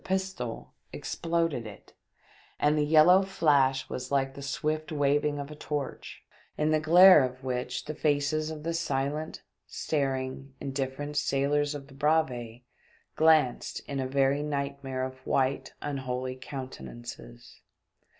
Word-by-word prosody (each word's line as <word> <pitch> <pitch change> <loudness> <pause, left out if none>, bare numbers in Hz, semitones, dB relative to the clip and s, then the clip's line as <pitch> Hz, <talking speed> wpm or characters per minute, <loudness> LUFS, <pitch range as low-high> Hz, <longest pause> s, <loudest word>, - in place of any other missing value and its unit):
pistol 190 -11 -3 0.2
exploded 165 -8 -2
it, 105 - -13 0.7
and 150 +1 +3
the 150 - +2
yellow 160 +5 +6
flash 145 -8 +2
was 125 +1 -6
like 135 -1 +1
the 140 - -9
swift 155 +3 -2
waving 145 0 +1
of 145 +1 -6
a - - -8
torch, 145 -2 -5 0.3
in 150 +1 +1
the 155 - +3
glare 170 0 +8
of 130 0 -4
which 125 -1 -3
the 155 - -4
faces 155 +1 0
of 155 -1 -7
the 165 +1 -2
silent, 150 -1 -2 0.2
staring, 135 -1 -3
indif 135 -1 -3
ferent 145 +1 -6
sailors 145 +1 +1
of 140 -1 -7
the 135 - -16
Braave 135 -6 0 0.5
glanced 155 -5 +3
in 140 -1 -5
a 130 - -1
very 135 +1 +2
nightmare 140 -3 -3
of 130 0 -5
white, 130 +1 0
unholy 130 -2 -3
countenances. 65 - -9
140 Hz, 135 wpm, -28 LUFS, 130-155 Hz, 0.7 s, glare